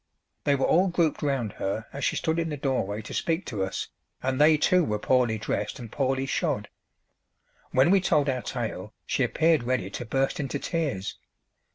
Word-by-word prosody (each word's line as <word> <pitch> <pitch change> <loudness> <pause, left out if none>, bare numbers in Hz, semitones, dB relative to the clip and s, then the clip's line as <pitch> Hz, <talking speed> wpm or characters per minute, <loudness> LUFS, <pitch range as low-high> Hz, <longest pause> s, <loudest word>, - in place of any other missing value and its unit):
They 145 - +4
were 135 - +1
all 185 +4 +4
grouped 170 -4 +1
round 135 -7 -1
her 105 +3 -2
as 140 - -5
she - - +1
stood 160 +1 0
in 165 -1 -1
the 150 - -3
doorway 110 -7 -1
to - - -8
speak 165 +1 -1
to 105 -6 -2
us, 95 - -3 0.3
and 130 +2 0
they 155 +1 +7
too 180 +4 +4
were 105 -8 0
poorly 120 0 +2
dressed 110 - -2
and 120 -5 -9
poorly 135 -1 0
shod. 140 - -1 1.0
When 130 +6 +4
we 195 -1 +5
told 150 -5 +2
our 130 -2 0
tale 110 -6 -5
she - - -1
appeared 160 +5 +3
ready 120 -5 -1
to 120 - -5
burst 135 +8 0
into 140 -1 -2
tears. 140 - -2
135 Hz, 190 wpm, -27 LUFS, 115-155 Hz, 1.0 s, they